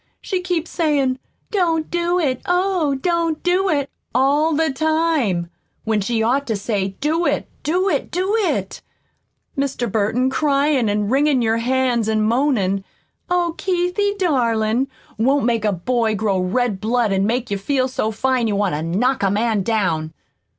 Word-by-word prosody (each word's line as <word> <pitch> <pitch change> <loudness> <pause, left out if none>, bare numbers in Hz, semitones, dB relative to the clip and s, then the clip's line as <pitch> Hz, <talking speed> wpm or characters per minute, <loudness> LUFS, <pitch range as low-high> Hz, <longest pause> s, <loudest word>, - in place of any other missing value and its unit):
She 375 -2 -3
keeps 355 -3 -2
sayin', 280 -6 +1 0.3
'Don't 335 -6 0
do 345 +1 +1
it, 270 -8 0
oh, 355 -5 +1
don't 335 +2 -1
do 365 +2 +2
it,' 285 -4 0 0.2
all 290 +5 +3
the 320 0 +1
time, 280 - 0 0.3
when 220 -2 0
she 225 +2 0
ought 270 +5 +1
to 225 - 0
say, 195 -2 -2
'Do 320 +4 +1
it, - - -1
do 360 +5 0
it, - - 0
do 375 +4 0
it!' 435 -4 -1 0.7
Mr. 275 -3 -2
Burton, 230 +4 +1
cryin' 280 -4 +2
an' 205 0 0
wringin' 275 0 +2
your 225 0 +2
hands 245 -2 +1
an' 215 -1 +1
moanin', 215 -5 +1 0.5
'Oh, 350 -2 +1
Keithie, 380 +3 0
darling!' 240 - +1 0.3
won't 270 +3 +2
make 230 -3 +1
a 210 - +3
boy 220 +4 0
grow 200 -2 0
red 200 +2 -1
blood 225 -1 +1
an' 195 +1 +1
make 240 0 -1
you 200 - -1
feel 255 +5 0
so 250 -4 -2
fine 245 +2 0
you 210 - 0
want 200 -3 0
to 150 - -2
knock 215 +11 0
a 195 - +2
man 215 +1 +1
down! 180 -7 -1
255 Hz, 165 wpm, -20 LUFS, 215-315 Hz, 0.7 s, all